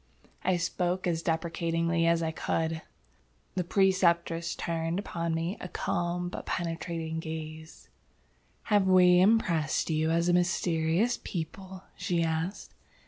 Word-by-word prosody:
I 185 -1 +2
spoke 180 +1 -1
as 165 -2 0
deprecatingly 165 0 0
as 170 0 +3
I 160 - 0
could. 160 0 -1 0.7
The 180 - -1
Preceptress 170 -3 +2
turned 165 +1 -2
upon 170 -4 -2
me 165 +4 -2
a - - -6
calm 175 0 -2
but 175 - -7
penetrating 165 -1 -3
gaze. 160 0 -7 0.8
"Have 205 -3 +2
we 180 -1 +6
impressed 175 -8 +2
you 155 0 +1
as 170 +1 +2
a 175 - +3
mysterious 175 +4 +1
people?" 185 +2 -6
she 170 -2 0
asked. 165 +4 -3
170 Hz, 125 wpm, -29 LUFS, 165-180 Hz, 0.8 s, we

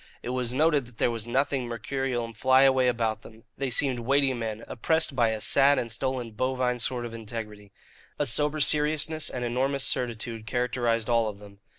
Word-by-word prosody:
It - - -5
was 125 -1 -2
noted 145 -1 +1
that 120 -2 -19
there - - +1
was 115 -1 -4
nothing 130 +1 0
mercurial 125 +1 -3
and 115 -1 -11
flyaway 130 +1 +4
about 115 -3 -1
them. 110 0 -15
They 135 0 -3
seemed 125 0 +2
weighty 135 +2 +1
men, 115 -2 -5
oppressed 160 +3 -1
by 120 -3 +2
a 110 -1 -3
sad 140 +5 +4
and 115 - -2
stolid 125 -3 -3
bovine 130 0 -1
sort 120 0 -2
of 115 - -8
integrity. 105 -3 -8 0.5
A 145 - 0
sober 150 +4 +2
seriousness 150 +1 +4
and 125 -1 -4
enormous 135 +3 0
certitude 115 -2 -2
characterized 120 -1 -1
all 115 -2 +2
of 100 - -9
them. 100 -1 -15
125 Hz, 185 wpm, -26 LUFS, 115-135 Hz, 0.5 s, flyaway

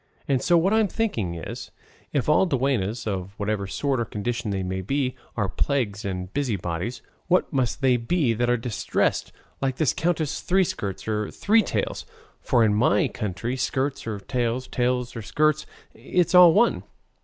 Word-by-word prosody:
And 135 -2 +1
so 175 - +4
what 185 +5 +2
I'm 220 -1 +4
thinking 115 - -2
is, 80 - -7 0.4
if 140 -4 0
all 150 +5 +4
duennas, 125 - 0
of 95 -2 -4
whatever 105 -1 -2
sort 135 +5 -1
or 115 - 0
condition 115 +2 -3
they 95 -1 -1
may 95 +1 -3
be, 130 +5 -1 0.2
are 105 -3 +1
plagues 110 0 -1
and 90 -2 -4
busybodies, 110 -4 -2 0.2
what 180 -2 +2
must 130 -1 0
they 130 -2 +4
be 125 +1 +1
that 120 +2 0
are 120 - +3
distressed, 115 -2 -1 0.3
like 135 -1 0
this 150 -1 +1
Countess 160 -3 -1
Three 190 +1 +3
skirts 100 - -4
or 105 -1 -1
Three 220 +2 +3
tails! - - -3 0.3
for 120 -4 +3
in 105 -2 +3
my 105 -1 +3
country 105 +5 -3
skirts 130 +1 -2
or 105 -3 -3
tails, 120 +4 -2
tails 125 0 -1
or 115 - -4
skirts, 155 +7 +1 0.3
it's 180 0 0
all 180 -2 +9
one." 230 +8 +3
120 Hz, 170 wpm, -25 LUFS, 105-145 Hz, 0.4 s, all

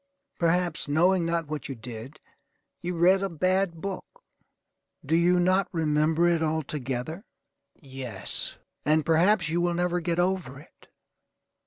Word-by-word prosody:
Perhaps, 170 -1 +1
knowing 170 +4 +3
not 170 -1 0
what 150 -1 -5
you 135 - -4
did, 120 +5 -9 0.6
you 180 +1 -3
read 185 +3 +5
a 195 - -1
bad 185 0 0
book. 200 - -7 0.8
Do 160 +4 +1
you 175 +1 +4
not 185 +2 +3
remember 160 0 +2
it 170 -2 +2
altogether? 155 - -3 0.5
Yes; 130 - -6 0.3
and 155 +1 +2
perhaps 175 +2 +3
you 170 +2 0
will 175 0 +1
never 175 0 0
get 170 0 -1
over 175 -7 -1
it. 150 - -19
165 Hz, 135 wpm, -27 LUFS, 150-180 Hz, 0.8 s, read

